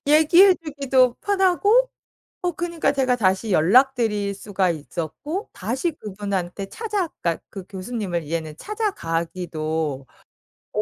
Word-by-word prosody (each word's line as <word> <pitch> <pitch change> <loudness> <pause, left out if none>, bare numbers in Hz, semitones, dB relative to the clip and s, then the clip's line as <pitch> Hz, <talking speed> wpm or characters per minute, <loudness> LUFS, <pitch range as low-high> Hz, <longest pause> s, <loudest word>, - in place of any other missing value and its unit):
얘기해 340 +6 +7
주기도 275 -6 +1
편하고 405 +5 +3 0.5
어 355 - 0
그니까 340 0 -1
제가 260 -2 +2
다시 195 0 +1
연락드릴 210 - +3
수가 195 -2 -1
있었고 170 - -4
다시 255 - -2
그분한테 200 - -4
찾아 415 - -2
그러니까 170 -2 -1
그 195 -3 -8
교수님을 190 -3 -4
이제는 155 0 -4
찾아가기도 165 - -3 0.7
어 - - +1
215 Hz, 290 characters per minute, -23 LUFS, -, 0.7 s, 얘기해